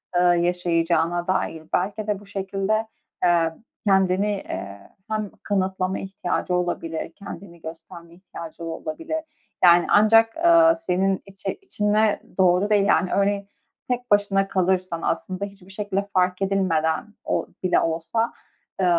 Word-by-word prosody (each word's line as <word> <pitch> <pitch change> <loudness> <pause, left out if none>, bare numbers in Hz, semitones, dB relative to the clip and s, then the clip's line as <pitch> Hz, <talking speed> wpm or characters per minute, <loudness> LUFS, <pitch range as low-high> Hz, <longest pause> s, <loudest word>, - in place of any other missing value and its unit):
eee, 175 - +4
yaşayacağına 175 -1 +2
dair? 165 -4 -1
Belki 205 +3 -1
de 205 -2 -1
bu 205 - -15
şekilde, 200 +2 -1 0.4
eee, 170 -2 +3 0.3
kendini, 190 +1 +3
eee, 100 - -6 0.2
hem 215 -2 -2
kanıtlama 190 -1 -1
ihtiyacı 185 -1 -3
olabilir, 170 -2 -2
kendini 185 -4 -10
gösterme 165 +1 -10
ihtiyacı 170 -2 -10
olabilir. 315 - -4 0.4
Yani, 175 -1 +7
ancak, 225 +2 +5
eee, 330 0 +6
senin 195 - 0
içi 195 0 -5
içine 215 - +1 0.2
doğru 185 +2 +3
değil. 205 -2 +4
Yani, 185 -2 +2
örneğin 200 0 +1 0.4
tek 245 -2 -3
başına 200 -1 +3
kalırsan, 185 -2 0
aslında 190 -1 -2
hiçbir 195 -2 -14
şekilde 200 0 -2
fark 185 0 +1
edilmeden, 190 -1 0
o - - -1 0.2
bile 185 - +3
olsa, 165 +8 -1 0.5
eee, 185 - +2
190 Hz, 125 wpm, -23 LUFS, 175-205 Hz, 0.5 s, Yani